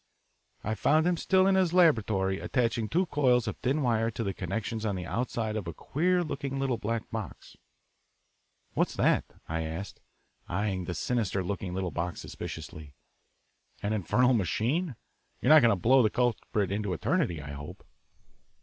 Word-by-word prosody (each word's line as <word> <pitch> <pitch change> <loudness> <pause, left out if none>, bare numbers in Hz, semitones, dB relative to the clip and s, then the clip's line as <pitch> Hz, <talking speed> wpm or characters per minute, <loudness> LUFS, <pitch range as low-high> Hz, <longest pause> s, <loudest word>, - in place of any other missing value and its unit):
I 110 - -1
found 150 +9 +3
him 180 0 +3
still 185 +2 +3
in 195 - +4
his 185 -3 +2
laboratory 110 - +3
attaching 115 -3 0
two 180 +3 +2
coils 125 -7 +2
of - - -3
thin 140 +4 0
wire 115 -2 +2
to 115 0 -4
the 100 -2 -2
connections 110 +4 -3
on 105 -3 -1
the 90 -1 -4
outside 110 +3 -2
of 105 -5 -3
a 85 - -5
queer 180 +4 +1
looking 140 -3 -4
little 135 -4 0
black 115 +1 -3
box. 110 -5 -7 1.2
"What's - - 0
that" - - +2 0.2
I 80 0 -2
asked, 80 +5 -6 0.5
eyeing 95 0 -1
the 90 - -4
sinister 100 -3 -1
looking 90 -1 -4
little 95 -2 -2
box 85 0 -3
suspiciously. 75 -2 -8 0.9
"An 105 +1 0
infernal 125 +6 +3
machine? 120 - 0 0.4
You're 145 - +5
not 155 - +9
going 120 - +5
to - - +3
blow 130 +8 +4
the 110 - +3
culprit 110 -4 0
into 100 -2 -1
eternity, 85 0 0
I 70 -1 -7
hope." 70 +1 -9
110 Hz, 165 wpm, -29 LUFS, 95-130 Hz, 1.2 s, not